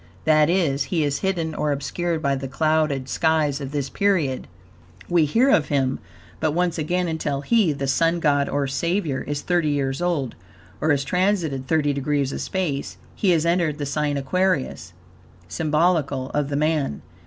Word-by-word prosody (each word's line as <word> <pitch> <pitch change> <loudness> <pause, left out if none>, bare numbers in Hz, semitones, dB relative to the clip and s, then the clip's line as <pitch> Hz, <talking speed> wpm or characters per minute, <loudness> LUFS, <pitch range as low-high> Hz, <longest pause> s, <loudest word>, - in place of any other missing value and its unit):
That 155 0 +4
is, 155 -7 +1
he 165 -4 0
is 140 -1 -1
hidden 170 -4 -1
or 150 - -1
obscured 160 +4 -2
by 140 0 +2
the 135 0 -4
clouded 155 -2 0
skies 155 -2 +1
of 135 - -4
this 145 -2 -2
period. 165 -6 0 0.6
We 170 -3 +3
hear 235 - +3
of 155 - +3
him 135 -2 0 0.4
but 155 -2 0
once 175 0 0
again 180 +4 0
until 150 -4 -2
he, 210 +1 +3
the 140 -1 -3
Sun 165 +6 +2
God, 145 -3 +2
or 145 0 0
Savior, 145 +2 -1
is 145 0 -3
thirty 175 -4 +1
years 135 0 -1
old, 165 -8 -1 0.5
or 155 - +1
has 140 -2 +2
transited 165 -4 0
thirty 150 -2 +2
degrees 140 0 0
of - - -4
space. 165 -8 -3 0.2
He 200 - 0
has 165 -2 +3
entered 170 -3 +1
the 145 - -3
sign 145 0 -1
Aquarius 140 - -1 0.5
(symbolical 150 - 0
of 145 -1 -1
the 140 - -2
Man.) 150 - 0
150 Hz, 170 wpm, -23 LUFS, 140-170 Hz, 0.6 s, That